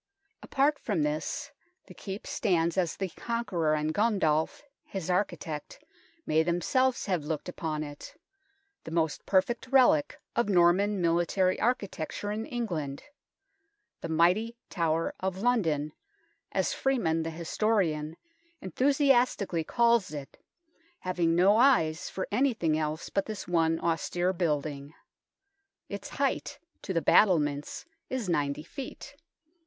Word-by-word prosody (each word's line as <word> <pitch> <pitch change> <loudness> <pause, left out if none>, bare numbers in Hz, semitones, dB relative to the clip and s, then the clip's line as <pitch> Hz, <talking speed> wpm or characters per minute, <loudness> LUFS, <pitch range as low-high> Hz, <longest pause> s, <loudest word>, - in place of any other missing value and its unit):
Apart 285 +2 +1
from 190 -9 -1
this, 150 +1 -3 0.3
the - - -13
Keep 195 +1 -7
stands 170 -5 +1
as 180 -4 0
the 190 -1 -2
Conqueror 175 -8 -1
and 155 +1 -1
Gundulf, 190 - +1 0.2
his 185 -2 -4
architect, 175 -5 -2 0.5
may 155 +1 +3
themselves 240 - +1
have 180 -6 -1
looked 155 +2 -4
upon 155 -3 -3
it 145 -1 -9 0.7
the - - -8
most 160 -2 -1
perfect 215 +6 +1
relic 250 - +4 0.2
of 235 -2 +1
Norman 190 +3 +4
military 175 +2 +1
architecture 205 -4 -2
in 220 +2 -3
England; 175 - -3 0.5
" 400 +1 -49
the 165 - -5
mighty 180 +8 +2 0.2
Tower 165 -2 0
of 190 0 -2
London," 160 -12 +1 0.6
as 190 -2 0
Freeman, 205 -12 +1
the 160 - -3
historian, 165 -2 -1 0.4
enthusiastically 250 - +2
calls 235 +2 +2
it, 145 -3 -9 0.6
having 175 -2 +1
no 195 +5 +5
eyes 185 - +3
for 190 - -4
anything 220 - +1
else 155 0 -2
but 195 - -1
this 215 -3 -6
one 165 -2 +2
austere 175 +2 0
building. 150 -4 -2 0.9
Its - - -6
height - - -1 0.2
to - - -5
the 165 -3 0
battlements 150 -8 +3 0.2
is 255 -6 -3
90 145 -3 0
ft. 265 - -8
175 Hz, 125 wpm, -29 LUFS, 160-220 Hz, 0.9 s, no